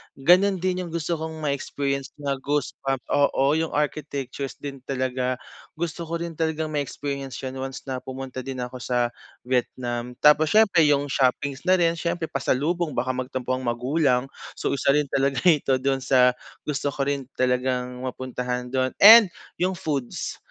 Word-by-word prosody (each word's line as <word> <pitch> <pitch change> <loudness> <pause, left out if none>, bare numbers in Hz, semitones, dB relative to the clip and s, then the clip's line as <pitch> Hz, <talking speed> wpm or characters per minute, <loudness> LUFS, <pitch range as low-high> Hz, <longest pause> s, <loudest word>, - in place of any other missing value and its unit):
Ganun 180 +5 +4
din 185 -1 -1
yung - - -10
gusto 165 0 -2
kong 160 0 -6
ma-experience 140 -1 -2
na 140 -1 -1
goosebump 135 -1 -2
oo 140 -1 +3
yung 160 +1 0
architectures 140 -2 -3
din 140 -1 -7
talaga. 130 -1 -1 0.4
Gusto 170 0 -4
ko 165 - -3
din 170 -1 -5
talagang 160 -1 -1
ma-experience 140 -2 -4 0.2
once 135 0 -6
na 130 -2 -4
pumunta 130 0 -7
din 130 -1 -5
ako 125 +1 -7
sa 120 -1 0 0.3
Vietnam. 125 -1 -2
Tapos 150 +3 +5
siyempre 200 -8 +5
yung 145 -1 +2
shoppings 135 +4 0
na 185 - +6
rin, 170 -2 +1
siyempre 170 -1 -2
pasalubong 150 +5 0
baka 130 - 0
magtampo 130 0 -4
ang 130 -1 -2
magulang. 125 +2 +1 0.2
So - - -2
isa 140 0 +2
rin 150 -2 0
talaga 135 0 +1
ito 150 -6 +4
dun 135 0 +1
sa 130 -1 +4 0.3
gusto 145 -1 -2
ko 140 - -4
rin 140 -2 -2
talagang 125 0 -1
mapuntahan 125 -1 -4
dun 130 0 0
and 225 +2 +11 0.3
yung 185 +1 +1
foods. 150 -8 -3
140 Hz, 155 wpm, -24 LUFS, 130-155 Hz, 0.4 s, and